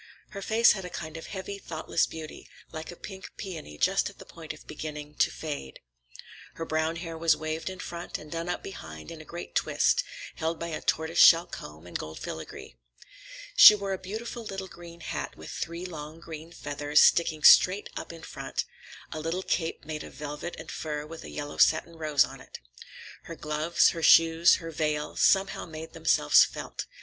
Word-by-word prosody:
Her 200 - -7
face 225 +3 +5
had 195 -2 -2
a 180 - -6
kind 160 -2 -7
of 165 - -7
heavy, 200 +1 -6
thoughtless 160 -2 -1
beauty, 160 -1 -9 0.2
like 160 0 -7
a 175 - -7
pink 190 +1 -9
peony 160 - -7
just - - +2
at - - -16
the - - -12
point - - -9
of - - -12
beginning 150 -1 -7
to - - +4
fade. 145 - -6 0.8
Her 165 - -4
brown 160 +1 0
hair 165 -1 -6
was 165 -1 +3
waved 155 +2 -3
in 185 - -7
front 175 -1 -6
and 150 - -12
done 170 +1 -3
up 180 - -3
behind 80 - -9
in 165 -2 -9
a - - -13
great 170 +2 -8
twist, - - +2 0.3
held 160 +1 -1
by 170 - -4
a 155 - -4
tortoiseshell 165 +1 +5
comb 75 +2 -10
with 90 - -5
gold 80 0 -7
filigree. 80 -5 -8 0.8
She 210 - +11
wore 200 -1 -3
a 190 - -4
beautiful 225 +5 -6
little 195 -3 -5
green 170 -1 -12
hat - - -5
with - - -9
three 170 +2 -5
long 155 -2 -8
green 160 0 -9
feathers 145 -2 0
sticking 160 -2 +4
straight 190 +3 +7
up - - -6
in 165 -1 -11
front, - - -4 0.5
a 155 - -4
little 165 +4 -2
cape 165 -4 -2
made 155 0 -5
of - - -11
velvet 150 +3 -6
and 160 - -8
fur 150 -1 -4
with 160 +1 -9
a - - -9
yellow 145 0 -6
satin 165 +1 +3
rose 155 -4 +3
on - - -11
it. - - -11 0.7
Her 165 - -7
gloves, 155 +2 +2
her 165 - -4
shoes, 165 +1 +6
her 165 -1 -6
veil, 150 -1 -2
somehow 195 -1 +2
made 160 0 -8
themselves 165 - +5
felt. - - -5
165 Hz, 190 wpm, -28 LUFS, 155-175 Hz, 0.8 s, She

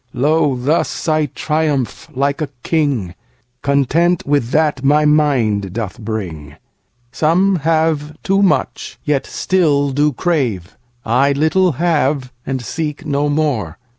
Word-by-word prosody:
Lo, 145 +1 +2
thus 145 +9 -1
I 155 -1 +2
triumph 150 -5 -2
like 140 +4 0
a 150 - -2
king, 140 - 0 0.5
Content 155 +5 +1
with 140 -4 +1
that 150 -2 +1
my 150 +2 +3
mind 125 -11 +2
doth 110 -4 -5
bring. 90 - -5 0.6
Some 180 +7 +2
have 155 -1 0
too 195 +1 +2
much, 195 - 0
yet 145 -2 0
still 145 -7 +1
do 145 +2 +2
crave;I 120 - -1
little 160 +5 +2
have, 145 -4 0
and 130 -2 -2
seek 150 +6 -4
no 145 0 0
more. 140 - -1
145 Hz, 120 wpm, -17 LUFS, 125-155 Hz, 0.6 s, my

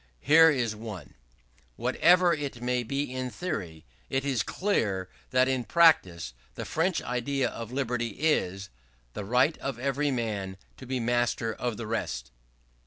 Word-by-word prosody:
Here 160 - +7
is 125 -7 0
one: 105 - -8 0.6
"Whatever 180 - +4
it 145 -5 -4
may 125 +1 0
be 140 +2 -3
in 130 0 -3
theory, 95 - -5 0.2
it 135 +1 -1
is 130 -5 +1
clear 105 - -1 0.2
that 130 0 +3
in 130 -2 0
practice 95 - +3 0.2
the - - -5
French 175 +3 0
idea 125 +1 -1
of 115 0 -7
liberty 125 -4 -2
is 100 - 0 0.4
the - - -5
right 125 +9 +3
of 135 -3 -4
every 140 +3 0
man 105 -7 -2 0.2
to 130 - -11
be 130 0 -1
master 120 -1 0
of 120 -2 -3
the 115 - -5
rest." 80 - -3
125 Hz, 150 wpm, -28 LUFS, 110-140 Hz, 0.6 s, Here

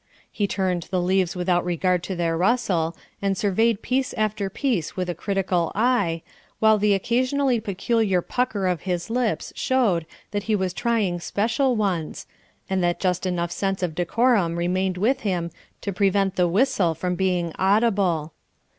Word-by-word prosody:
He 205 -2 -1
turned 185 -3 -1
the 185 -1 0
leaves 185 0 +1
without 180 0 +1
regard 180 +1 +1
to 190 - -4
their 170 -1 0
rustle, 175 -4 +1 0.2
and 195 -1 0
surveyed 215 +2 +1
piece 260 +1 0
after 215 -2 -1
piece 205 - -1
with 180 -1 -2
a - - -4
critical 185 -1 -1
eye, 205 -8 +1 0.3
while 220 -1 +4
the 205 0 +3
occasionally 255 +4 +1
peculiar 200 -2 0
pucker 245 -6 -1
of 180 -3 0
his 180 +2 -3
lips 240 -2 -1
showed 225 - +1 0.2
that 205 - -1
he 215 - +4
was 190 -3 -1
trying 220 -6 0
special 230 +8 0
ones, 185 -7 -2 0.4
and 190 -1 0
that 175 0 +1
just 185 0 0
enough 175 -1 -1
sense 195 0 -2
of 175 -3 -1
decorum 180 0 +2
remained 180 +2 0
with 230 +9 +2
him 175 -5 -2 0.3
to 200 - -3
prevent 195 0 +1
the 180 -1 +3
whistle 185 -4 +2
from 180 +2 -2
being 180 -3 0
audible. 190 -6 +2
190 Hz, 160 wpm, -24 LUFS, 175-220 Hz, 0.4 s, while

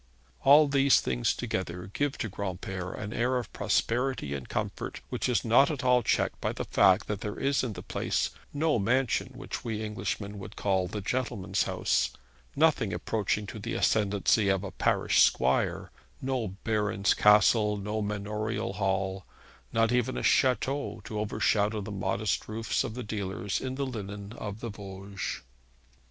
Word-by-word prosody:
All 145 +2 +7
these 140 -1 +5
things - - 0
together 90 0 -4
give 145 -1 -1
to - - -2
Granpere 95 -2 -4
an 105 +1 -5
air 125 +2 +1
of 125 - -5
prosperity 120 - 0
and 70 -2 -6
comfort - - -3
which - - -1
is 125 - +1
not 120 +5 +5
at 145 -4 -3
all 125 -1 +4
checked - - 0
by - - -1
the - - -4
fact 95 +2 +4
that 105 -2 -4
there 105 - -4
is 140 -1 +1
in 120 -4 -2
the 90 - -8
place - - -1 0.2
no 150 -3 +1
mansion 120 +3 +1
which - - -6
we 110 -2 -3
Englishmen 105 -1 -4
would 100 +1 -9
call 95 -2 +1
the 105 +3 -5
gentleman's 120 -3 -1
house, - - +1 0.5
nothing - - +3
approaching 105 -1 -1
to 105 - -7
the 100 - -4
ascendancy 100 0 +2
of 95 0 +1
a 100 - -5
parish - - +2
squire, 65 +1 +2 0.3
no 130 -4 -1 0.2
baron's 105 -3 +1
castle, 105 0 +5
no 105 +2 -3
manorial 105 0 -2
hall, 95 -1 -1 0.5
not 115 0 +2
even 125 +1 +1
a - - -3
chateau 135 +2 +1
to 105 -2 -4
overshadow 105 0 +1
the 105 0 -6
modest 100 +1 -1
roofs 110 +1 -1
of 110 - -5
the 125 - -4
dealers 100 -2 -3
in 130 0 -3
the 140 0 -1
linen 100 -4 -6
of 105 -2 -6
the 115 - -4
Vosges. 100 -1 -6
105 Hz, 165 wpm, -29 LUFS, 100-120 Hz, 0.5 s, All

